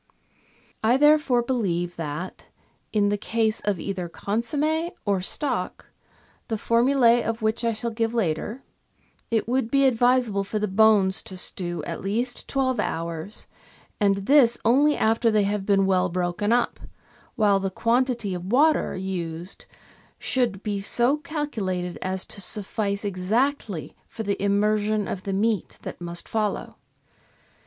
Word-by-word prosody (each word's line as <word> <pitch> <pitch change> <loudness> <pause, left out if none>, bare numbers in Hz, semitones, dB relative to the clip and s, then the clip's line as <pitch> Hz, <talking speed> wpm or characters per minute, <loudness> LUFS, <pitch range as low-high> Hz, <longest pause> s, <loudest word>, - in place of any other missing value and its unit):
I 235 +4 +4
therefore 295 -4 +4
believe 180 -9 -1
that, 165 +3 -6 0.4
in 205 -2 +2
the 205 0 -1
case 220 0 0
of 205 -4 -1
either 185 -1 -4
consomme 295 - -1 0.2
or 200 -3 +1
stock, 280 +9 -3 0.6
the 225 - -2
formulas 240 +1 +3
of 225 0 -3
which 220 +2 0
I 230 -1 +1
shall 230 +2 -3
give 225 0 -1
later, 210 - -1 0.7
it 225 -2 0
would 250 -1 0
be 275 +1 +3
ad 260 - +4
visable 245 -4 +2
for 200 +2 -3
the 210 0 0
bones 200 -1 +4
to 185 - -8
stew 175 -1 -2
at 165 - -5
least 235 +6 -2
twelve 260 -2 0
hours, 165 +4 -3 0.5
and 200 -2 +2
this 260 -3 +5
only 285 +6 +4
after 225 +1 +2
they 215 -2 +3
have 200 0 -2
been 195 -1 +4
well 185 -1 +2
broken 180 +4 -1
up, 245 +1 +1 0.6
while 205 -4 +3
the 195 0 -1
quantity 235 0 0
of 180 +2 -5
water 300 +4 +3
used 175 -2 -5 0.5
should 235 -7 -1
be 205 -2 -2
so 240 +7 +2
calculated 220 - -3
as 185 0 -1
to 200 - -4
suffice 205 0 -1
exactly 205 - -1
for 225 - -6
the 200 -2 -2
im 200 0 +2
mersion 210 0 +1
of 185 - -5
the 195 - -2
meat 210 -1 0
that - - -7
must 170 0 -5
follow. 215 -2 -2
210 Hz, 145 wpm, -25 LUFS, 190-240 Hz, 0.7 s, this